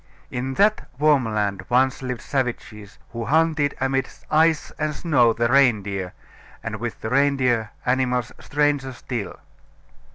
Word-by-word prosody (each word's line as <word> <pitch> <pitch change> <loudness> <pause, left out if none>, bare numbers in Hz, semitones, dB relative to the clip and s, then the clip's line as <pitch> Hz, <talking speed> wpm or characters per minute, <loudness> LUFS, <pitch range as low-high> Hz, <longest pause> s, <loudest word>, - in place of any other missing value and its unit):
In 130 +2 -3
that 210 +5 +2
warm 145 -3 +3
land 105 -2 -1
once 130 +2 +2
lived 125 -2 -4
savages, 110 -6 -4
who 115 -1 -5
hunted 155 -1 +2
amid 135 0 0 0.2
ice 160 0 +3
and 155 -1 -1
snow 135 -9 +3
the 115 +1 0
reindeer, 105 -8 +2 0.5
and 110 -1 -4
with 120 +1 -5
the 110 - -3
reindeer 130 -5 +2 0.2
animals 125 -2 0
stranger 145 -2 0
still. 120 -3 -5
130 Hz, 130 wpm, -23 LUFS, 115-145 Hz, 0.5 s, warm